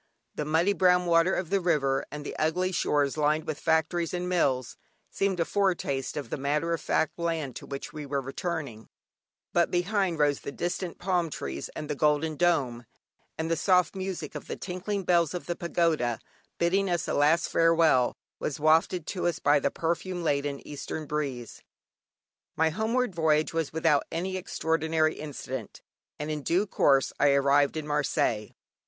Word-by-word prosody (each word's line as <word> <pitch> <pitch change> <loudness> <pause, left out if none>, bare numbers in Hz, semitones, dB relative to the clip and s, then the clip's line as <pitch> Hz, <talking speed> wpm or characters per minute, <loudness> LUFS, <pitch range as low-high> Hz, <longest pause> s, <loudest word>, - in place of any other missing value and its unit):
The 150 - -3
muddy 165 +6 +2
brown 180 -2 +4
water 170 +2 +3
of 180 -2 -3
the 200 - +3
river 140 -6 +1
and 150 0 -7
the - - -5
ugly 180 +4 +1
shores 145 -5 +1
lined 155 +1 +1
with 155 - -4
factories 165 +2 +1
and 180 0 -3
mills, 135 -9 0 0.4
seemed 195 -2 0
a 165 - +2
foretaste 175 -11 -1
of 145 - -5
the - - -1
matter 150 +5 0
of 165 - -2
fact 160 +2 0
land 165 -6 -2
to - - -10
which 140 -1 -6
we 150 -2 -6
were 140 0 -1
returning; 135 -4 -5 0.6
but 170 -1 +3
behind 180 -1 0
rose 145 -2 +2
the - - -6
distant 175 +2 -3
palm 175 -2 0
trees, - - -5
and 150 - -5
the 150 - -1
golden 150 +2 +1
dome; 140 -8 +1 0.5
and 160 +1 -2
the - - +3
soft 180 +2 +2
music 185 -5 -4
of - - -7
the - - -4
tinkling 195 +2 -4
bells 170 -2 +2
of 175 - -5
the 175 - -2
pagoda, 165 -9 0 0.4
bidding 190 +3 +2
us 175 -2 -1
a - - -1
last 150 +4 +3
farewell, 165 -6 +3 0.2
was 150 - -3
wafted 160 +2 +3
to 180 -1 -2
us 170 -2 0
by 145 0 +3
the - - +1
perfume 175 +2 -2
laden 140 -2 -1
eastern 150 +2 -5
breeze. 140 -6 -4 0.9
My 160 0 +2
homeward 225 +4 0
voyage 155 -2 +2
was 165 -3 -1
without 160 -2 +2
any 185 +3 -2
extraordinary 160 -3 0
incident, 130 -6 -7 0.3
and 150 +1 -4
in 150 -1 -3
due 175 +8 +1
course 140 -8 +2
I 145 -1 +5
arrived 140 +2 +3
at 155 - -3
Marseilles. 140 -7 0
160 Hz, 170 wpm, -28 LUFS, 145-175 Hz, 0.9 s, I